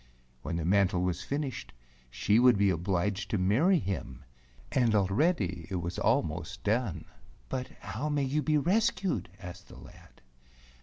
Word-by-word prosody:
When 85 - -4
the 85 -1 -2
mantle 95 0 +2
was 90 -1 -1
finished 140 +4 -4 0.4
she 100 - +2
would 125 -3 +6
be 100 -1 +3
obliged 95 +3 -1
to 110 - 0
marry 120 - +3
him, 80 - -4 0.5
and 120 -4 +2
already 95 - +1
it 95 - -3
was 85 0 -3
almost - - -1
done. 110 -3 -1 0.2
" - - -27
But 130 -1 -3
how 110 +9 -4
may 145 -1 0
you 140 +3 0
be 150 +2 +2
rescued 195 +4 +1
?" - - -29
asked 90 +3 -10
the - - -13
lad. - - -16
100 Hz, 160 wpm, -30 LUFS, 90-135 Hz, 0.5 s, would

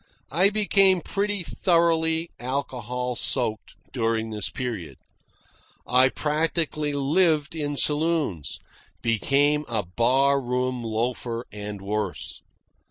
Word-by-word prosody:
I 180 +7 +4
became 195 -3 +4
pretty 205 +2 -2
thoroughly 165 -1 +1
alcohol 125 -1 -3
soaked 115 -2 -1 0.2
during 115 -2 0
this 105 -2 -2
period. 100 - -5 0.9
I 130 +1 +4
practically 155 0 -1
lived 155 +2 +2
in 145 -3 -3
saloons; 150 - 0 0.5
became 140 +6 +2
a 110 -3 -1
bar 130 +9 +2
room 125 0 -1
loafer, 115 +1 -2
and 105 -1 -7
worse. 105 -2 -3
135 Hz, 100 wpm, -25 LUFS, 115-160 Hz, 0.9 s, I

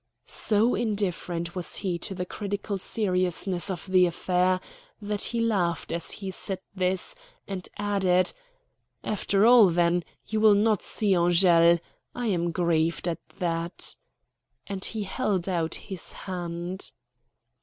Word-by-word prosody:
So 220 +3 +4
indifferent 180 -6 -2
was 180 -2 +2
he 180 -4 -2
to 190 - -5
the 180 -1 -3
critical 200 +1 -4
seriousness 185 -3 0
of 180 -4 -4
the 185 -2 +4
affair 180 +1 +1 0.4
that 205 -1 -3
he 235 - -1
laughed 195 -7 0
as 170 0 -2
he 195 -2 -4
said 190 +1 -1 0.2
this, 185 - -1 0.3
and 190 -2 -6
added: 195 -3 +2 0.7
"After 205 0 +1
all, 235 -4 +7
then, 175 0 +2 0.2
you 220 - -2
will 215 -1 +6
not 210 -1 +2
see 205 -3 +1
Angele. 170 -1 +5 0.4
I 245 - -3
am 175 -5 0
grieved 170 -1 0
at 170 - -2 0.2
that," 170 -2 -3 0.7
and 195 -2 -5
he 220 -2 0
held 195 -3 -1
out 170 -3 -1
his 190 -5 -3
hand. 175 0 -5
185 Hz, 135 wpm, -26 LUFS, 175-205 Hz, 0.7 s, all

